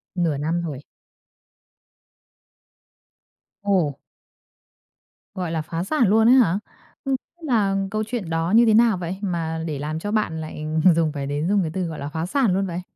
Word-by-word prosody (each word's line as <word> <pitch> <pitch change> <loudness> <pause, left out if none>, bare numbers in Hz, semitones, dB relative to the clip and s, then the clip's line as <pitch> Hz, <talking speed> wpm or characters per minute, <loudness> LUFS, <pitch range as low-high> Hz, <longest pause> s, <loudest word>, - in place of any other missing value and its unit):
Nửa 165 -5 0
năm 165 +4 -1
rồi. 140 -5 -5 2.8
Ồ! 180 -9 +1 1.4
Gọi 180 -3 -3
là 160 -1 -1
phá 165 +2 -4
sản 245 0 +2
luôn 220 +3 +4
ấy 255 - +7
hả? 200 -6 +4 0.5
Ng 270 -1 +1 0.3
là 205 -6 +2 0.2
câu 215 0 -1
chuyện 220 -8 -4
đó 165 +2 -1
như 235 +1 +7
thế 220 - +4
nào 225 -3 +5
vậy 180 +2 -4
mà 165 -4 -2
để 145 -3 -3
làm 155 +2 -3
cho 205 +4 -4
bạn 160 -7 -1
lại 155 -1 -6 0.3
dùng 160 -2 +2
phải 140 -2 -4
đến 145 +4 -2
dùng 205 -1 +3
cái 160 -3 -2
từ, 185 - -1
gọi 160 -2 -6
là, 140 +1 -4
phá 160 +2 -3
sản 225 -1 +1
luôn 195 +1 +1
vậy? 175 +1 -4
175 Hz, 175 wpm, -23 LUFS, 160-205 Hz, 2.8 s, ấy